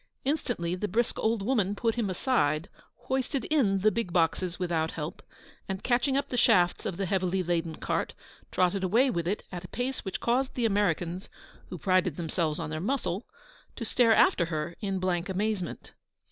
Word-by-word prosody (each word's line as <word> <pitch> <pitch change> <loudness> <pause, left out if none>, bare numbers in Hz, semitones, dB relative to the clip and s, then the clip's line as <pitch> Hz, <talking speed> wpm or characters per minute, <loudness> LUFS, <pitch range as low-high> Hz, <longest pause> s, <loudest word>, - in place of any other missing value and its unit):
Instantly 245 - -1
the 185 +3 -2
brisk 230 +5 0
old 220 -2 +1
woman 205 -4 +1
put 225 +2 +1
him 225 -4 -1
aside, 170 - +1 0.3
hoisted 260 +1 -1
in 205 -11 +3
the 215 +2 +5
big 230 -6 -2
boxes 175 +1 +1
without 165 -3 -1
help, 155 +2 -5 0.5
and, 190 0 -3
catching 260 +2 +2
up 280 0 -1
the 250 - -2
shafts 175 -6 +4
of 185 -5 -4
the 195 - -1
heavily 185 0 0
laden 165 -2 -1
cart, - - -2 0.4
trotted 185 +1 +1
away 235 +8 +3
with 170 -1 -2
it 200 +4 -1
at 175 -1 -6
a - - -7
pace 250 +6 -3
which 190 - -4
caused 255 +3 +1
the 245 - +1
Americans 185 -4 0 0.4
(who 180 - -5
prided 185 -1 +2
themselves 160 -2 -1
on - - -4
their 155 - -2
muscle) 200 -3 -1 0.5
to 230 - -4
stare 230 0 +4
after 170 - +4
her 165 +1 -3
in 195 -2 -2
blank 185 0 -1
amazement. 195 -2 -2
190 Hz, 180 wpm, -29 LUFS, 175-230 Hz, 0.5 s, the